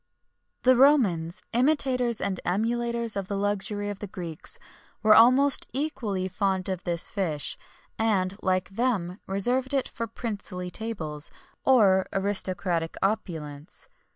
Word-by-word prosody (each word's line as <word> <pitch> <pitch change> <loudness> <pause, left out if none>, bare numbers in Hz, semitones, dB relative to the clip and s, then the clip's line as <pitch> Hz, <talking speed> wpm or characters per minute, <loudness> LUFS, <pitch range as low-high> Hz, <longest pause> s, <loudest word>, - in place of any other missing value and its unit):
[XXI - - -51
33] 255 - +6
The - - +3
Romans, 190 - +3
imitators 250 -3 +2
and 190 -2 -1
emulators 235 +3 0
of 195 -2 -3
the 200 - -3
luxury 205 0 -1
of 200 - -8
the 205 - -6
Greeks, 170 -4 -5 0.5
were 215 0 +7
almost 255 +5 +6
equally 240 -10 -2
fond 190 0 -1
of 185 -1 -4
this 170 -1 +1
fish; 160 -7 -2 0.4
and, 200 -4 +1
like 185 -1 0
them, 200 -4 -1
reserved 250 +8 0
it 270 - +1
for 230 - -5
princely 205 -6 -5
tables, 160 -10 -4 0.3
or 200 -8 +4
aristocratic 185 -4 0
opulence. 165 -6 -4
200 Hz, 130 wpm, -26 LUFS, 185-235 Hz, 0.5 s, were